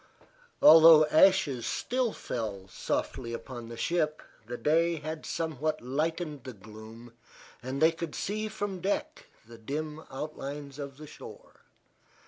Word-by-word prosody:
Although 160 -1 +9
ashes 160 -8 +4
still 250 -2 -1
fell 105 - -5
softly 115 +5 -3
upon 120 0 -7
the 115 - -8
ship 155 0 -1 0.2
the 120 +1 -5
day 165 +4 +2
had 155 0 -6
somewhat 155 -1 -2
lightened 150 +2 -3
the 130 - -7
gloom 110 +3 -12 0.5
and 130 +2 -4
they 160 +1 +5
could 165 -1 -6
see 215 +2 -2
from 205 -3 -4
deck 295 - -2 0.2
the 115 0 -13
dim 150 +6 -5
outlines 140 0 -6
of 140 -2 -7
the 155 - -10
shore. - - -13
150 Hz, 130 wpm, -29 LUFS, 120-165 Hz, 0.5 s, Although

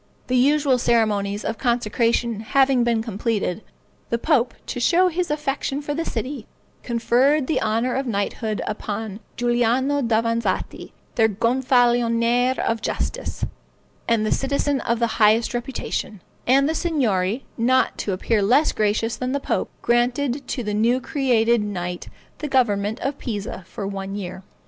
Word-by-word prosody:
The 255 - -1
usual 275 0 +3
ceremonies 210 -4 +1
of 225 - -3
consecration 235 -1 +1
having 265 +2 +3
been 230 -2 +1
completed, 215 -2 -2 0.5
the 235 - +1
pope, 245 -2 +1
to - - -4
show 355 +8 +4
his 355 +1 -2
affection 285 -2 -2
for 290 0 -3
the 325 +3 -2
city, 255 -2 -4 0.3
conferred 255 +5 +2
the 315 - 0
honor 230 +3 0
of 270 0 -2
knighthood 215 0 -2
upon 210 0 -4 0.2
Giuliano 245 +4 +1
Davanzati, 230 -3 -1 0.2
their 225 -1 +4
Gonfalonier 240 +1 +2
of 230 -1 -1
Justice, - - -3 0.6
and 225 -2 +2
a - - -1
citizen 280 0 0
of 235 0 0
the 230 -1 -1
highest 220 +3 +4
reputation; 240 -5 -4 0.2
and 275 +3 +4
the 315 - 0
Signory, 245 - 0
not 255 +2 +2
to 205 - -2
appear 205 +3 0
less 255 +10 +4
gracious 215 +2 0
than 255 +1 -2
the 280 - 0
pope, - - -1
granted 245 +3 +1
to 250 - -3
the 210 -1 -3
new 230 +4 +2
created 235 -5 +2
knight 180 -4 -4 0.3
the 300 - -3
government 220 -6 +1
of 275 +1 -2
Pisa 205 -4 -5
for 200 - -6
one 195 0 -4
year. 190 -2 -6
235 Hz, 145 wpm, -22 LUFS, 215-265 Hz, 0.6 s, show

